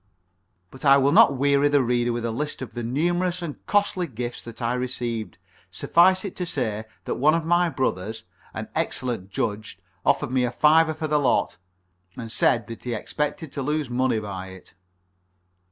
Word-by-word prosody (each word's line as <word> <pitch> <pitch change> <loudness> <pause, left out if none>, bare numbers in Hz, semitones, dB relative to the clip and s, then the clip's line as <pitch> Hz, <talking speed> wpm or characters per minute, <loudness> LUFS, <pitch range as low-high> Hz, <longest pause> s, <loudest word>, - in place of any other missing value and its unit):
But 130 - -12
I 140 -1 +7
will 140 +1 +3
not 140 -2 +6
weary 140 +1 +3
the 145 -2 +3
reader 120 0 +1
with 120 0 -3
a 115 - -1
list 145 +3 -4
of 130 - -9
the 120 - -4
numerous 175 +8 0
and 155 -4 -7
costly 200 -3 +1
gifts 120 -2 -5
that 115 -1 -10
I 120 -1 0
received. 120 -3 -3 0.3
Suffice 185 +4 +3
it 195 - -6
to 180 - -2
say 110 -8 -2 0.2
that - - -2
one 155 +4 +4
of 165 -1 -1
my 175 +1 +3
brothers, 110 - -2 0.3
an - - -5
excellent 120 -7 -2
judge, 105 +1 -3 0.3
offered - - +1
me 130 -1 +2
a 125 - +1
fiver 155 +5 +4
for 155 0 -3
the 150 0 +2
lot, 130 - +1 0.6
and 115 -2 -6
said 115 -1 +2
that 115 -1 -9
he 120 -2 -2
expected 150 +6 -3
to 140 - -4
lose 150 -1 -2
money 130 -1 +1
by 100 -3 -5
it. 95 -1 -13
130 Hz, 185 wpm, -24 LUFS, 115-150 Hz, 0.6 s, I